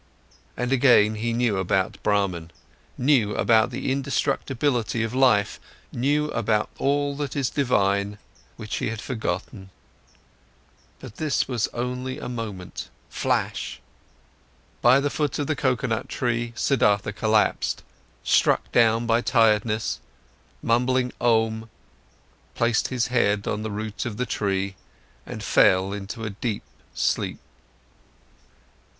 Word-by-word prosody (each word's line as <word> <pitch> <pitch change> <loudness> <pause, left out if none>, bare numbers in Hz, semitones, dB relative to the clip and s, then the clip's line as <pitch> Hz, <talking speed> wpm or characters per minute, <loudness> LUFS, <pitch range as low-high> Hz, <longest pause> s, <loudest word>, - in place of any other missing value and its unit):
and 125 +1 -2
again 120 -5 +5
he 115 +2 -2
knew 115 -3 +1
about 95 0 0
Brahman, 95 -5 0 0.5
knew 125 -6 +2
about 110 -1 +3
the - - -3
indestructibility 135 -3 0
of 115 +1 -3
life, 125 -6 +3 0.3
knew 145 +4 0
about 110 -1 0
all 145 0 +1
that 145 -1 -4
is 135 -4 0
divine, 100 -6 +1 0.4
which 110 -1 -4
he - - -1
had 115 -1 -5
forgotten. 95 -5 -4 1.3
But - - -11
this 155 -3 0
was 120 -4 0
only 125 +2 -4
a - - -6
moment, 105 - -6 0.2
flash. - - -2 1.0
By 125 +3 +6
the 145 0 -1
foot 150 -2 -1
of 145 - -1
the 155 - -1
coconut 130 -4 -1
tree, 120 -1 -1
Siddhartha 105 -6 +2
collapsed, 110 +1 +1 0.4
struck - - +2
down 115 0 +4
by 115 +1 +2
tiredness, 110 -3 +2 0.6
mumbling 125 +2 +1
Om, 110 -1 +1 0.9
placed 120 -1 +1
his 125 -3 0
head 105 -4 +2
on 105 - -2
the 110 - -3
root 110 +2 -4
of 105 -3 -5
the 125 - -1
tree 100 -4 -1 0.5
and - - -6
fell 95 +1 +4
into 105 +3 -6
a 110 - -3
deep 105 +1 -3 0.3
sleep. - - 0
115 Hz, 120 wpm, -24 LUFS, 105-130 Hz, 1.3 s, By